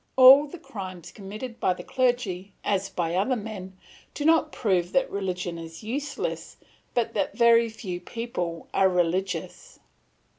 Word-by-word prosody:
All 265 Hz, +3 st, +9 dB
the 325 Hz, -, -9 dB
crimes 185 Hz, -, -8 dB
committed 215 Hz, +4 st, -8 dB
by 185 Hz, -, +2 dB
the -, -, -9 dB
clergy, 235 Hz, -7 st, -1 dB
as 195 Hz, -1 st, 0 dB
by 170 Hz, -1 st, -2 dB
other 200 Hz, +9 st, +1 dB
men, 200 Hz, -4 st, -7 dB, 0.4 s
do 290 Hz, -, -3 dB
not 320 Hz, -1 st, +4 dB
prove 185 Hz, -6 st, 0 dB
that 265 Hz, -1 st, +2 dB
religion 180 Hz, -3 st, -3 dB
is 165 Hz, +3 st, -9 dB
useless, 275 Hz, +7 st, -4 dB, 0.4 s
but 240 Hz, -2 st, +1 dB
that 200 Hz, -2 st, -1 dB
very 235 Hz, -1 st, +5 dB
few 195 Hz, -5 st, -6 dB
people 180 Hz, -6 st, -4 dB
are 190 Hz, 0 st, +4 dB
religious. 185 Hz, -, -2 dB
200 Hz, 145 wpm, -26 LUFS, 180-245 Hz, 0.4 s, All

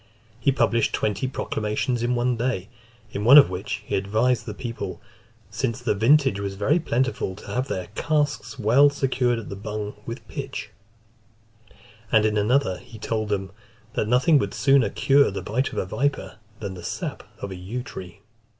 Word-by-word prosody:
He 135 Hz, +4 st, +3 dB
published 115 Hz, -4 st, +2 dB
twenty 105 Hz, +4 st, 0 dB
proclamations 115 Hz, 0 st, -2 dB
in 120 Hz, +1 st, +1 dB
one 120 Hz, +1 st, +1 dB
day, 115 Hz, -5 st, -2 dB, 0.4 s
in 100 Hz, -, -3 dB
one 130 Hz, +6 st, +9 dB
of 140 Hz, -10 st, +8 dB
which 100 Hz, +3 st, -4 dB
he -, -, -6 dB
advised 110 Hz, +5 st, +1 dB
the 105 Hz, -, -5 dB
people, 115 Hz, +1 st, -5 dB, 0.5 s
"Since 115 Hz, +1 st, -2 dB
the 120 Hz, -3 st, 0 dB
vintage 130 Hz, +2 st, +4 dB
was 100 Hz, -1 st, -3 dB
very 150 Hz, -, +2 dB
plentiful, 130 Hz, -, -1 dB
to -, -, -13 dB
have 130 Hz, +2 st, -1 dB
their 95 Hz, -8 st, -3 dB
casks 150 Hz, 0 st, -1 dB
well 130 Hz, +5 st, +5 dB
secured 130 Hz, -3 st, 0 dB
at 115 Hz, -, -7 dB
the -, -, -5 dB
bung 105 Hz, +1 st, -5 dB
with 115 Hz, -1 st, -7 dB
pitch:" 85 Hz, -, -6 dB, 1.4 s
and 110 Hz, -1 st, +5 dB
in 110 Hz, -1 st, +1 dB
another, 105 Hz, -2 st, +2 dB
he 115 Hz, -, -13 dB
told 110 Hz, 0 st, -2 dB
them, 95 Hz, -2 st, -2 dB, 0.4 s
"that 105 Hz, -, -1 dB
nothing 135 Hz, +6 st, +4 dB
would -, -, -3 dB
sooner 135 Hz, -6 st, +4 dB
cure 140 Hz, +6 st, +4 dB
the 100 Hz, -, -5 dB
bite 125 Hz, +6 st, -1 dB
of -, -, -8 dB
a -, -, 0 dB
viper, 135 Hz, +4 st, -2 dB, 0.2 s
than 100 Hz, -3 st, -5 dB
the 90 Hz, -, -9 dB
sap -, -, -4 dB, 0.2 s
of 100 Hz, -, -6 dB
the -, -, -5 dB
yew 110 Hz, +8 st, -5 dB
tree." 95 Hz, -7 st, -9 dB
115 Hz, 175 wpm, -24 LUFS, 105-130 Hz, 1.4 s, one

